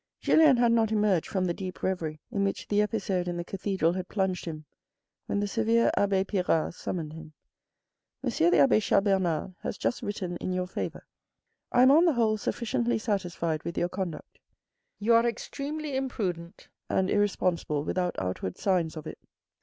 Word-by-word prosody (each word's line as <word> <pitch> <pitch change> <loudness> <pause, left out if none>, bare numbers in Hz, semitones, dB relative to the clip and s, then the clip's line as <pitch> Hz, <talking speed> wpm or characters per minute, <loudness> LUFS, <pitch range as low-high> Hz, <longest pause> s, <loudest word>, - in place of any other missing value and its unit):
Julien 305 -5 +5
had 240 -1 +4
not 225 -2 +2
emerged 210 -6 +2
from 190 -2 0
the 175 - 0
deep 185 0 -7
reverie 160 -5 -2
in 200 - 0
which 195 - -2
the 205 0 +2
episode 200 -4 -1
in 175 0 -2
the 175 - -3
cathedral 190 -2 0
had 185 0 -4
plunged 190 -3 -1
him, 155 -2 -6 0.6
when 205 - 0
the 205 - 0
severe 225 +2 +2
abbe 195 -1 +2
Pirard 180 -6 0
summoned 160 -3 -5
him. 160 -1 -11 0.4
" - - -58
M. - - 0
the 170 +2 +3
abbe 145 +8 +5
Chas 205 - +2
Bernard 185 -3 0
has - - -4
just - - -1
written 185 -4 -4
in 185 - -3
your 185 0 -1
favour. 180 - -5 0.7
I 245 - +5
am 260 - +7
on 320 +5 +6
the 335 - +4
whole 225 -3 +2
sufficiently 235 +2 -1
satisfied 175 -7 -2
with 170 - -6
your 175 - +1
conduct. 180 -5 -6 0.6
You 220 +3 +2
are 230 +1 +5
extremely 285 +4 -4
imprudent 185 -10 -4 0.2
and 190 - +1
irresponsible 180 -7 0
without 180 +2 -1
outward 90 0 -3
signs 180 -5 0
of 155 - -7
it. 155 - -8
190 Hz, 175 wpm, -28 LUFS, 175-220 Hz, 0.7 s, am